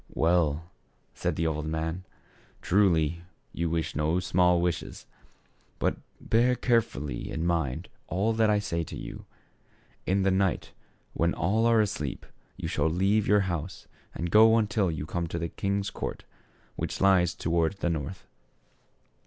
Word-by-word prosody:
"Well," 80 Hz, -2 st, +2 dB, 0.5 s
said -, -, -2 dB
the 80 Hz, -, -1 dB
old 75 Hz, -1 st, -1 dB
man, 80 Hz, +3 st, -3 dB, 0.6 s
"truly 85 Hz, -4 st, +2 dB, 0.3 s
you 85 Hz, 0 st, -1 dB
wish 80 Hz, 0 st, -2 dB
no 80 Hz, +4 st, +1 dB
small 90 Hz, 0 st, +3 dB
wishes; 85 Hz, -1 st, -3 dB, 0.7 s
but, -, -, 0 dB, 0.2 s
bear 120 Hz, +3 st, +2 dB
carefully 75 Hz, -, -1 dB
in 80 Hz, -, -3 dB
mind 80 Hz, -7 st, -1 dB, 0.2 s
all 100 Hz, +6 st, 0 dB
that 110 Hz, -1 st, +3 dB
I 105 Hz, -, +4 dB
say 85 Hz, -5 st, -2 dB
to -, -, -8 dB
you. -, -, -8 dB, 0.8 s
In 95 Hz, +1 st, +2 dB
the 95 Hz, -, +3 dB
night, 95 Hz, -1 st, 0 dB, 0.4 s
when 85 Hz, +1 st, +1 dB
all 110 Hz, +6 st, +2 dB
are 115 Hz, -1 st, +5 dB
asleep, 75 Hz, -9 st, -3 dB, 0.3 s
you -, -, -4 dB
shall 75 Hz, +2 st, +1 dB
leave 100 Hz, +5 st, +2 dB
your 105 Hz, 0 st, +5 dB
house 90 Hz, -2 st, -4 dB, 0.3 s
and 85 Hz, 0 st, -3 dB
go 110 Hz, +3 st, +7 dB
until 105 Hz, -3 st, +1 dB
you 75 Hz, -2 st, -3 dB
come 85 Hz, +1 st, -3 dB
to 85 Hz, +1 st, -4 dB
a 85 Hz, -, -2 dB
king's 100 Hz, +2 st, -2 dB
court, -, -, -5 dB, 0.5 s
which -, -, -4 dB
lies 95 Hz, -3 st, +4 dB
toward 85 Hz, +1 st, 0 dB
the 100 Hz, -3 st, -2 dB
north. 80 Hz, +4 st, -5 dB
90 Hz, 150 wpm, -28 LUFS, 80-100 Hz, 0.8 s, go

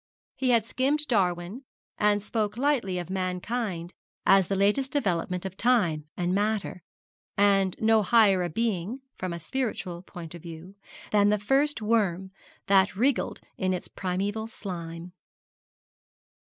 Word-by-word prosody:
He 260 Hz, -1 st, 0 dB
had 230 Hz, -3 st, +4 dB
skimmed 280 Hz, +6 st, 0 dB
Darwin, 185 Hz, +2 st, 0 dB, 0.4 s
and 205 Hz, -1 st, +3 dB
spoke 210 Hz, 0 st, -2 dB
lightly 250 Hz, -9 st, +1 dB
of 175 Hz, 0 st, -5 dB
mankind 185 Hz, -1 st, -3 dB, 0.3 s
as 195 Hz, -2 st, +5 dB
the 195 Hz, -, 0 dB
latest 210 Hz, +8 st, +2 dB
development 180 Hz, -, -1 dB
of 190 Hz, -1 st, -5 dB
time 180 Hz, -11 st, +2 dB
and 180 Hz, 0 st, 0 dB
matter, 205 Hz, -2 st, -1 dB, 0.6 s
and 195 Hz, -2 st, +3 dB
no 220 Hz, 0 st, +4 dB
higher 200 Hz, -2 st, +4 dB
a 175 Hz, -, -1 dB
being, 220 Hz, -, -2 dB, 0.2 s
from 185 Hz, -1 st, -3 dB
a 170 Hz, -, -4 dB
spiritual 185 Hz, -5 st, -3 dB
point 175 Hz, -4 st, -9 dB
of 170 Hz, -, -9 dB
view, 170 Hz, +3 st, -10 dB, 0.4 s
than 205 Hz, -1 st, +4 dB
the 210 Hz, -, +3 dB
first 270 Hz, +4 st, +1 dB
worm 190 Hz, -4 st, +1 dB, 0.3 s
that 195 Hz, 0 st, +4 dB
wriggled 255 Hz, +5 st, 0 dB, 0.2 s
in 185 Hz, 0 st, +1 dB
its 180 Hz, -, -4 dB
primeval 200 Hz, +4 st, -3 dB
slime. 175 Hz, -5 st, -7 dB
195 Hz, 140 wpm, -27 LUFS, 180-225 Hz, 0.6 s, as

